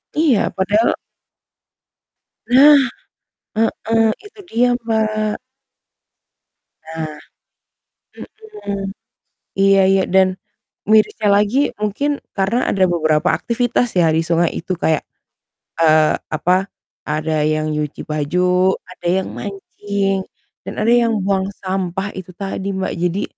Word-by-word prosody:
Iya, 300 -8 +2
padahal 205 +4 +2 1.6
Nah, 280 +4 +7 0.8
heeh, 225 0 +1 0.2
itu 415 0 -14
dia, 245 +2 +3 0.2
Mbak. 215 -1 0 1.5
Nah 160 -1 -6 1.5
mhm. 200 -1 -2 0.7
Iya 195 0 +5
iya, 195 0 +3
dan 190 0 +4 0.6
mirisnya 215 0 +3
lagi 210 +8 +2
mungkin 280 +8 -1 0.2
karena 205 +6 0
ada 190 -1 +2
beberapa 155 -3 +1
aktivitas 245 0 0
ya, 165 -2 +4
di 160 - +2
sungai 170 0 +2
itu 185 +3 -3
kayak, 160 -2 +1 0.8
eee, 155 -1 +4 0.2
apa, 180 +5 +1 0.4
ada 155 0 -1
yang 155 0 0
nyuci 150 -1 -3
baju, 180 +5 +1 0.2
ada 180 - -7
yang - - -7
mancing, 195 -1 -3 0.4
dan - - -5
ada 220 - +1
yang 235 -1 +3
buang 190 -1 +1 0.2
sampah 190 +1 -2
itu 185 0 -8
tadi, 195 +1 -4
Mbak. 190 - -2
Jadi, 180 +3 0
195 Hz, 110 wpm, -18 LUFS, 175-220 Hz, 1.6 s, Nah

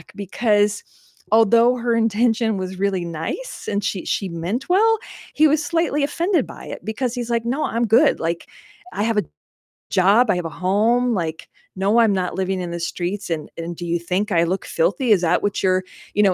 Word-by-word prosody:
because 205 +1 +1 0.5
although 230 +3 +5
her 240 -1 0
intention 225 0 +1
was 185 0 -5
really 195 -3 0
nice 170 - -5
and 205 0 -1
she 190 - -2
she 195 - -1
meant 175 +9 -4
well, 445 +5 +4 0.4
he 310 +1 +5
was 305 +1 +1
slightly 330 -2 0
offended 340 +6 0
by - - -11
it - - -8
because 230 +3 -2
he's 245 -2 -4
like, 235 -1 0
"No, 265 +6 -1
I'm 235 +1 0
good, 235 +7 +4
like, 170 +1 -3 0.4
I 205 - -2
have 225 0 0
a - - 0 0.7
job, 205 +6 +4
I 185 - +3
have 175 - -3
a - - -3
home, 220 +8 +1
like, 165 -5 -4 0.3
no, 200 +4 +2
I'm 225 -3 +4
not 185 -2 -2
living 190 0 -1
in 175 -1 -5
the 170 - -4
streets, 180 +4 -4
and 160 -3 -3
and 170 +1 -5
do 175 - -7
you 170 0 -1
think 185 +5 -2
I 170 -2 +3
look 185 +3 -2
filthy? 300 - 0
Is 205 - +6
that 170 - +1
what 205 -1 -1
you're, 185 0 +2 0.3
you 210 - +3
know, 195 -2 +4
205 Hz, 200 wpm, -21 LUFS, 185-240 Hz, 0.7 s, Is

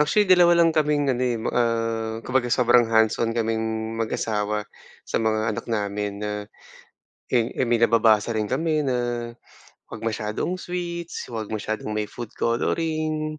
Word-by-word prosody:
Actually 175 +8 +3
2 175 -2 +6
lang 165 - +3
kaming 150 -3 +2
ano, 125 - -3
eh, 125 -2 +1
ma 110 - -2
ah, 115 -1 0
kumbaga 130 -1 +1
sobrang 120 -1 +4
hands-on 115 +1 +2
kaming 110 0 -1
mag-asawa 105 -1 -1 0.4
sa - - -1
mga 110 0 +1
anak - - -6
namin 105 -1 -2
na, 105 - -2 1.0
eh 120 -1 +3
eh, 130 - +2
may 120 -1 +1
nababasa 115 -2 +4
rin 105 - 0
kami 155 +5 0
na 120 -2 -2 0.5
'wag - - -9
masyadong 110 - -2
sweets, 170 -4 -5
'wag 110 -2 -4
masyadong 110 0 -3
may 105 -1 -2
food 120 -3 -8
coloring. 155 +4 -1
115 Hz, 150 wpm, -24 LUFS, 110-150 Hz, 1.0 s, 2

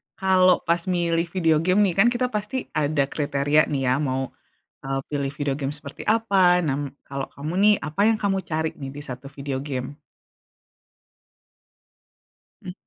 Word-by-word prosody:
kalo 185 -1 +4
pas 170 +1 +1
milih 170 -1 +1
video 160 -4 +3
game 185 +5 +2
nih, 185 -4 +2
kan 225 - +6
kita 250 +1 -1
pasti 210 +5 -3 0.2
ada 150 -1 +1
kriteria 145 0 +2
nih 135 -2 0
ya, 125 - +3
mau, 130 0 -2 0.5
eee 135 0 -2
pilih 140 -2 -1
video 140 -2 0
game 135 -1 -3
seperti 145 -1 -10
apa? 195 -6 +4
Nah, 135 - +1
m - - -3 0.2
kalau 135 0 -4
kamu 150 +3 -5
nih, 210 0 +7
apa 155 +4 -4
yang 220 - +1
kamu 195 -1 +1
cari 160 0 0
nih 135 -1 -5
di - - -6
satu 125 +2 -7
video 140 -1 -5
game? 135 -1 -4 2.7
Mmm. 180 -3 -7
155 Hz, 165 wpm, -24 LUFS, 140-185 Hz, 2.7 s, nih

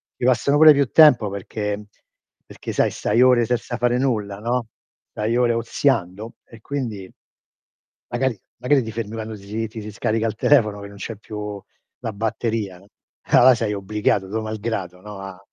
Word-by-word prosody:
ti - - -3
passano 130 +3 +3
pure 155 0 +9
più 140 -2 +2
tempo 130 -10 +6
perché 100 +1 -4
mhmm, 105 - -11 0.6
perché - - -7
sai, - - +2
stai 120 - 0
ore 125 -2 +5
senza 125 0 -2
fare 120 0 +1
nulla, 105 -7 -1
no, 120 0 -2 0.4
stai 110 +3 -1
ore 120 -1 +3
oziando, 115 -3 -1
e 115 - -15
quindi, 115 -10 -5 1.0
magari 120 -3 -1 0.2
magari 135 +1 +2
ti 110 - -6
fermi 115 -1 -5
quando 110 -1 -5
si 105 +3 -5
ti 110 +1 -9
si 105 0 -7
scarica 110 +2 -1
il 110 - -2
telefono 110 -7 +3
che 100 - -8
non 100 0 -13
c'è 110 +2 -6
più 105 -2 -7 0.4
la 115 -3 -4
batteria. 110 -2 -2 0.5
Ah, - - +7
là, 130 - +8
sei 110 -2 -1
obbligato, 100 -1 -1
tuo 110 +2 -2
malgrado, 105 -4 -4
no, 105 -1 -9
a 95 -1 -8
110 Hz, 175 wpm, -22 LUFS, 105-120 Hz, 1.0 s, pure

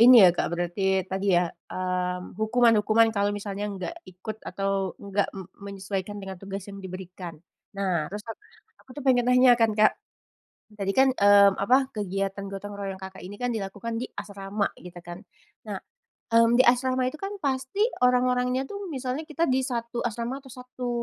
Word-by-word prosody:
ini 235 -3 +10
ya, 180 - +8
Kak, - - 0
berarti 185 +2 0
tadi 190 0 +1
ya, 175 0 +3 0.2
mmm, 180 -1 -2
hukuman-hukuman 225 -1 +4
kalau 200 0 +2
misalnya 205 0 -4
enggak 190 - -5
ikut 200 +4 -8
atau 195 0 -1
enggak 200 0 -1
me 190 - -6 0.3
menyesuaikan 195 +1 -4
dengan 195 -1 -6
tugas 195 -1 -6
yang 200 0 -9
diberikan. 185 -2 -8 0.4
Nah, 180 -6 0
terus 210 +1 -6
ak 225 - -6 0.5
aku 265 - -23
tuh - - -5
pengen 245 -2 +4
nanya 250 0 +7
kan, 225 -1 +4
Kak. 215 0 +5 0.8
Tadi 195 -1 -1
kan, 265 +5 +5
mmm, 200 -1 +7
apa, 260 +4 +4
kegiatan 195 0 -2
gotong 205 +1 -6
royong, 195 -1 -5
Kakak 190 -1 -9
ini 200 +3 -9
kan 245 -1 -1
dilakukan 210 +2 -4
di - - -2
asrama 200 0 -3
gitu 180 0 -11
kan. 175 +3 -9 0.4
Nah, - - -5 0.5
mmm, 230 +1 +5
di 255 - +7
asrama 255 +1 +3
itu 310 - -11
kan 395 +1 -4
pasti 265 +7 -1 0.2
orang-orangnya 250 +1 +2
tuh, 405 -1 -5
misalnya 270 -1 -4
kita 320 +1 0
di 260 0 +2
1 235 -1 -3
asrama 235 +4 -3
atau 265 -3 -14
1 250 0 -6
205 Hz, 170 wpm, -26 LUFS, 195-250 Hz, 0.8 s, ini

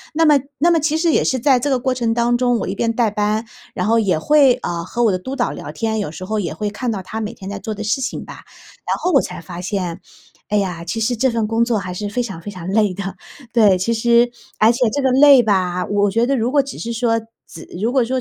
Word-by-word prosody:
那 325 +1 +3
么 295 -2 +5 0.2
那 340 +4 +4
么 335 - +3
其 310 +1 0
实 330 0 +2
也 - - +2
是 260 - 0
在 260 +1 +3
这 285 - -1
个 265 - +2
过 260 +1 0
程 235 -3 0
当 240 0 +2
中， 245 -1 +2
我 - - -3
一 190 - -2
边 230 +3 0
带 230 -2 +1
班， 210 +1 -1 0.3
然 180 - -1
后 230 +1 +3
也 195 -7 +1
会， 285 - +5
呃， 170 -1 -3
和 235 +7 -2
我 225 - +4
的 185 - -1
督 260 +9 -6
导 - - 0
聊 - - -7
天， 220 -1 -2
有 205 - -3
时 165 +4 -8
候 215 +2 -2
也 180 - -3
会 210 -1 -3
看 245 +4 -3
到 200 -3 -3
他 220 +4 -5
每 215 +1 -4
天 190 - -10
在 200 -1 -5
做 220 - -5
的 210 - -6
事 220 +6 0
情 265 - -4
吧。 - - -10 0.5
然 - - 0
后 360 - 0
我 275 - +6
才 - - -7
发 170 +1 -8
现， 185 -2 -3 0.5
哎 210 - +1
呀， 180 -4 -2
其 175 +6 -4
实 225 +3 0
这 260 +3 +2
份 230 -2 -1
工 225 +1 +1
作 235 -2 0
还 185 -2 -4
是 205 +3 -4
非 245 +4 -1
常 195 -8 -7
非 205 - -7
常 180 -3 -8
累 210 0 +2
的。 195 -1 -5 0.4
对， 210 -5 +5
其 190 +6 0
实 235 +1 +3 0.3
而 220 +2 +5
且 240 - -4
这 285 +6 -2
个 265 - +3
累 270 -1 +7
吧， 185 -4 0
我 205 0 +1
觉 230 +4 +1
得 275 +2 +1
如 235 0 0
果 290 0 +4
只 270 - -8
是 230 - -4
说 230 -1 0 0.3
只 165 - -11 0.2
如 225 +4 0
果 260 -1 +3
说 255 +2 -1
225 Hz, 300 characters per minute, -19 LUFS, 200-250 Hz, 0.5 s, 累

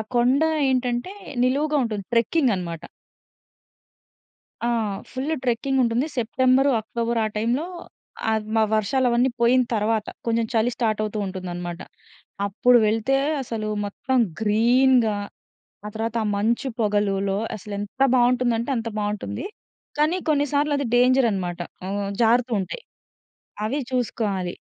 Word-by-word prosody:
కొండ 250 +4 +3 0.3
ఏంటంటే, 250 +6 -1 0.3
నిలువుగా 290 +4 +1
ఉంటుంది 215 -4 -3
ట్రెక్కింగనమాట. 210 - +1 1.9
ఆ! - - +2 0.4
ఫుల్లు 270 +5 -2
ట్రెక్కింగుంటుంది. 250 +1 +1
సెప్టెంబరు, 255 +4 +3
అక్టోబర్ 230 +1 -2
ఆ - - +1
టైంలో 235 +8 0 0.7
అద్ 220 -1 -1
మ - - +4 0.2
వర్షాలు 235 +5 +1
అవన్నీ 245 +2 +3
పోయిన 245 +2 +5
తర్వాత 215 0 0 0.2
కొంచెం 230 0 +1
చలి 230 +1 +2
స్టార్ట్ 220 -3 0
అవుతూ 215 0 -3
ఉంటుందనమాట. 175 -2 -5 0.7
అప్పుడు 245 +5 +4
వెళ్తే 225 +5 +1 0.3
అసలు 225 -3 -4 0.2
మొత్తం 260 +6 -2 0.2
గ్రీన్‌గా. 230 +1 +3 0.7
ఆ - - -3
తర్వాత 225 +1 -3
ఆ - - -1
మంచు 230 +6 0
పొగలులో 200 -2 +1 0.2
అసలెంత 205 +5 -5
బావుంటుందంటే 245 0 +2
అంత 230 0 -2
బావుంటుంది. 210 - -3 0.5
కానీ 305 +4 +3
కొన్నిసార్లు 290 0 +1
అది 280 -1 -1
డేంజరనమాట. 230 -9 +2 0.3
ఆహ్, 200 +1 -2
జారుతూంటాయి. 230 - +1 0.8
అవి 265 +7 -1
చూసుకోవాలి. 210 -7 -1
230 Hz, 110 wpm, -23 LUFS, 210-255 Hz, 1.9 s, పోయిన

